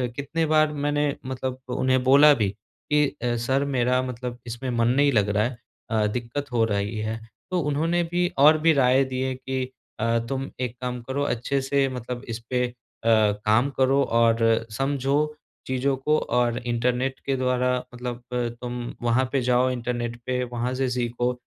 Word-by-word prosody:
कितनी 160 +4 -1
बार 155 0 +3
मैंने 145 0 0
मतलब 130 0 -4 0.2
उन्हें 130 0 +2
बोला 140 +3 +7
भी 105 -7 +1 0.4
कि 150 0 +4 0.2
अ, 120 -1 +1
सर 130 +4 0
मेरा 125 -2 +1
मतलब 125 -1 -5
इसमें 120 +3 -5
मन 115 -1 +1
नहीं 140 +3 +3
लग 105 -4 +2
रहा 105 +1 +2
है 120 +1 -3 0.3
अ, 110 -1 +2
दिक्कत 125 +5 -4
हो 115 -2 +2
रही 100 +2 -1
है। 110 +1 -3 0.3
तो 180 - +1
उन्होंने 160 +4 +1
भी 175 0 +2
और 150 +3 +7
भी 165 - +7
राय 130 0 +4
दिएँ 130 0 -2
कि 130 0 -3 0.4
अ, 115 +1 +2
तुम 135 0 -3
एक 125 -1 -2
काम 125 -1 -3
करो 135 +4 -2
अच्छे 135 +1 -1
से 135 0 +1
मतलब 125 -1 -6
इस 115 0 -3
पे 125 -1 +1
अ, - - -10 0.3
काम 110 +2 +3
करो 135 +1 +3
और 115 -1 +3
समझो 135 +3 0 0.5
चीज़ों 130 +1 0
को 150 +3 +1
और 120 -1 0
इंटरनेट 125 +2 -1
के 135 -1 +1
द्वारा 125 0 +1 0.2
मतलब 125 0 -5
अ, 120 -1 0
तुम 120 -1 -5
वहाँ 120 +2 +2
पे 135 -2 +1
जाओ 125 +1 +3
इंटरनेट 120 -1 -3
पे, 125 0 -1
वहाँ 120 +1 -3
से 130 0 0
सीखो 120 0 -1
125 Hz, 175 wpm, -25 LUFS, 120-135 Hz, 0.5 s, बोला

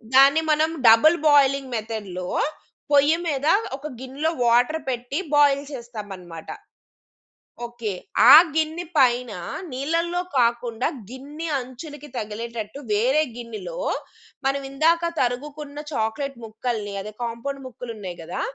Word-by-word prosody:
దాన్ని 280 +4 +7
మనం 310 +1 +3 0.2
double 310 +10 +7
boiling 275 -2 +3
మెథడ్‌లో 205 -5 -5 0.6
పొయ్యి 290 +3 +5
మీద 285 0 -1 0.3
ఒక 295 +2 -7
గిన్నెలో 270 +5 -2 0.2
వాటర్ 245 +7 +3
పెట్టి 250 +3 -3 0.2
బాయిల్ 285 -1 +4
చేస్తామన్నమాట. 205 -9 -8 1.2
ఓకే. 235 -3 -5 0.4
ఆ - - +13 0.2
గిన్నె 320 +2 -1
పైన 250 -3 +3 0.4
నీళ్ళల్లో 335 +6 -1 0.2
కాకుండా 235 0 +1 0.2
గిన్నె 290 +6 -7
అంచులకి 280 +4 -8
తగిలేటట్టు 225 +2 -5
వేరే 255 +8 +3
గిన్నెలో 240 - -7 0.7
మనం 275 +1 +1
ఇందాక 335 +4 +2
తరుగుకున్న 285 +4 -3
చాక్లేట్ 245 +3 -2
ముక్కల్ని 215 -2 -4
అదే 210 - -7
కాంపౌండ్ 240 +4 -4
ముక్కలున్నాయి 225 -8 -7
కదా! 165 +2 -5
255 Hz, 105 wpm, -23 LUFS, 230-290 Hz, 1.2 s, ఆ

